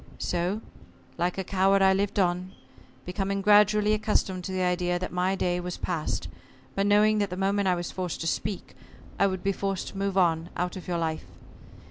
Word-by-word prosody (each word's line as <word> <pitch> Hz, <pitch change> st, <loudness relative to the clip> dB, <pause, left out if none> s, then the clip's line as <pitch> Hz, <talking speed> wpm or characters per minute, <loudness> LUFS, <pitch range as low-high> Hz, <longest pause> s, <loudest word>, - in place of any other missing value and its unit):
So, 180 Hz, +5 st, -1 dB, 0.6 s
like 175 Hz, +2 st, 0 dB
a 190 Hz, -, -1 dB
coward, 195 Hz, +1 st, +3 dB
I 190 Hz, 0 st, +6 dB
lived 200 Hz, +1 st, -1 dB
on, 180 Hz, -1 st, 0 dB, 0.5 s
becoming 195 Hz, +2 st, -2 dB
gradually 210 Hz, +1 st, +5 dB
accustomed 205 Hz, -3 st, 0 dB
to -, -, -4 dB
the 185 Hz, 0 st, -1 dB
idea 180 Hz, 0 st, +1 dB
that 185 Hz, -, -4 dB
my 180 Hz, +2 st, +1 dB
day 180 Hz, -2 st, 0 dB
was 180 Hz, 0 st, -5 dB
past, 165 Hz, -4 st, -2 dB, 0.5 s
but 195 Hz, +1 st, 0 dB
knowing 210 Hz, +1 st, +4 dB
that 205 Hz, -1 st, 0 dB
the 180 Hz, -, -5 dB
moment 195 Hz, +1 st, +1 dB
I 180 Hz, -, +3 dB
was 175 Hz, -1 st, -4 dB
forced 180 Hz, -3 st, -4 dB
to -, -, -3 dB
speak, 195 Hz, +4 st, -3 dB, 0.4 s
I 200 Hz, -, +5 dB
would 185 Hz, -2 st, -3 dB
be 195 Hz, -, +2 dB
forced 195 Hz, -1 st, -3 dB
to -, -, -10 dB
move 195 Hz, -1 st, -1 dB
on 165 Hz, -2 st, +2 dB
out 180 Hz, 0 st, -2 dB
of 185 Hz, -, -8 dB
your 175 Hz, -1 st, -1 dB
life. 160 Hz, -1 st, -2 dB
190 Hz, 195 wpm, -27 LUFS, 180-200 Hz, 0.6 s, I